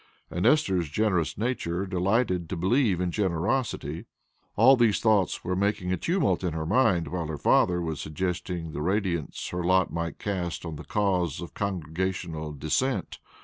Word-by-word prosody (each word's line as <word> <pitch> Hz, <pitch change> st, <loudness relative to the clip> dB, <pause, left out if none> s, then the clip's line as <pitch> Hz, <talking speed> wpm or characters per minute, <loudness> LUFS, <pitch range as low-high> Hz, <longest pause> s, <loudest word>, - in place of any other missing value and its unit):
And 90 Hz, -, +1 dB
Esther's 95 Hz, -, +2 dB
generous 90 Hz, -2 st, 0 dB
nature 100 Hz, -6 st, -1 dB
delighted 95 Hz, -1 st, 0 dB
to -, -, -2 dB
believe 100 Hz, +1 st, +2 dB
in 90 Hz, -1 st, 0 dB
generosity. 95 Hz, -, -1 dB, 0.5 s
All 130 Hz, +5 st, +7 dB
these 115 Hz, -5 st, +3 dB
thoughts 105 Hz, -5 st, +2 dB
were 90 Hz, -, -1 dB
making 95 Hz, -2 st, 0 dB
a -, -, 0 dB
tumult 165 Hz, -, +1 dB
in 90 Hz, -3 st, -1 dB
her 80 Hz, -1 st, -3 dB
mind 100 Hz, -3 st, +2 dB
while 85 Hz, -3 st, -3 dB
her 80 Hz, -1 st, -4 dB
father 90 Hz, +4 st, +3 dB
was 80 Hz, -2 st, -3 dB
suggesting 90 Hz, +1 st, -3 dB
the 75 Hz, -, -5 dB
radiance 90 Hz, -3 st, -1 dB
her 90 Hz, 0 st, -3 dB
lot 95 Hz, +1 st, +2 dB
might 85 Hz, 0 st, -3 dB
cast 90 Hz, -4 st, -3 dB
on 80 Hz, -2 st, -5 dB
the 75 Hz, -, -9 dB
cause 90 Hz, -8 st, 0 dB
of 85 Hz, -, -8 dB
congregational 85 Hz, -3 st, -3 dB
Dissent. 80 Hz, -, -1 dB
90 Hz, 160 wpm, -27 LUFS, 85-100 Hz, 0.5 s, All